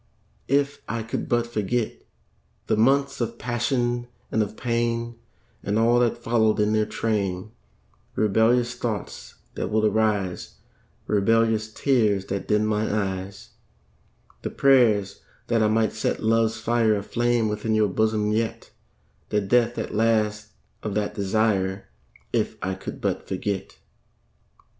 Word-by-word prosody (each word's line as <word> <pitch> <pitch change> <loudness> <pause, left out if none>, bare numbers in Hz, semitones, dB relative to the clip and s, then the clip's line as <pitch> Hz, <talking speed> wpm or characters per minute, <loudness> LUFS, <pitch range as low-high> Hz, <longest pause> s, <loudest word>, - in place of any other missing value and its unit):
If 140 +1 +1
I 115 0 -2
could 110 - -4
but 120 -1 +2
forget 115 0 -2 0.6
The - - +1
months 135 +5 +2
of 115 0 -2
passion 120 0 -1 0.2
and 110 - +2
of 105 0 -3
pain, 115 -1 -1 0.4
And 105 +1 -1
all 120 +2 +4
that 120 -1 +2
followed 115 -2 +1
in 105 +1 +2
their 110 -1 +2
train 100 -3 -2 0.6
Rebellious 115 +3 +2
thoughts 115 -4 -5 0.2
that - - -3
would 110 0 +2
arise, 105 -4 0 0.5
Rebellious 110 +1 +2
tears 110 -7 +1
that 100 0 -4
dimmed 105 0 +2
mine 110 0 0
eyes, 100 -1 -3 0.9
The - - -3
prayers 110 -8 +3 0.3
that 115 -2 +2
I 110 - +4
might 110 0 +1
set 110 - -2
love's 110 0 +2
fire 115 -1 +2
Aflame 120 +3 0
within 105 +1 -1
your 110 -1 +3
bosom 105 +1 +1
yet 110 +1 -2 0.6
The 105 - +2
death 120 +4 +2
at - - -4
last 105 -1 +1 0.3
of 105 -2 -4
that 105 -1 -1
desire 100 -1 0 0.4
If - - 0
I 95 +1 -1
could 95 - -7
but - - -2
forget. 95 +1 -3
110 Hz, 135 wpm, -24 LUFS, 105-120 Hz, 0.9 s, all